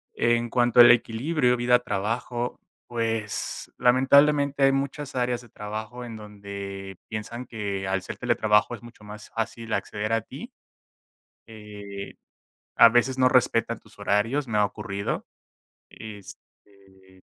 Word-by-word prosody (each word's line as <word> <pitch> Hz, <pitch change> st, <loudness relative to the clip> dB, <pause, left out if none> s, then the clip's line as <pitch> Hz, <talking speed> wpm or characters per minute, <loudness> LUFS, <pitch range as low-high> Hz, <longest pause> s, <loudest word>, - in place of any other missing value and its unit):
En 120 Hz, 0 st, +1 dB
cuanto 120 Hz, 0 st, +4 dB
al 120 Hz, -, +10 dB
equilibrio, 125 Hz, +3 st, +2 dB
vida, 125 Hz, 0 st, +4 dB
trabajo, 120 Hz, +2 st, -3 dB, 0.3 s
pues, 115 Hz, -3 st, -3 dB
lamentablemente 140 Hz, +3 st, +4 dB
hay 135 Hz, -, +5 dB
muchas 140 Hz, +1 st, -3 dB
áreas 125 Hz, -1 st, 0 dB
de 120 Hz, -, -16 dB
trabajo 110 Hz, +3 st, -7 dB
en 115 Hz, -2 st, -8 dB
donde 100 Hz, -2 st, -8 dB
piensan 115 Hz, +3 st, -6 dB
que 100 Hz, -4 st, -4 dB
al 95 Hz, 0 st, -1 dB
ser -, -, -7 dB
teletrabajo, 115 Hz, -2 st, +2 dB
es -, -, -10 dB
mucho 120 Hz, -2 st, -14 dB
más 105 Hz, +1 st, -11 dB
fácil 115 Hz, 0 st, -4 dB
acceder 105 Hz, +1 st, -2 dB
a 115 Hz, -, +2 dB
ti. -, -, -10 dB, 2.3 s
A -, -, +10 dB
veces 125 Hz, +3 st, +2 dB
no 130 Hz, -, +5 dB
respetan 115 Hz, -3 st, +2 dB
tus -, -, -21 dB
horarios, 110 Hz, +8 st, 0 dB
me 105 Hz, -2 st, 0 dB
ha 105 Hz, -, +5 dB
ocurrido, 100 Hz, -1 st, -4 dB, 0.6 s
este, 95 Hz, -2 st, -14 dB
115 Hz, 130 wpm, -25 LUFS, 105-125 Hz, 2.3 s, al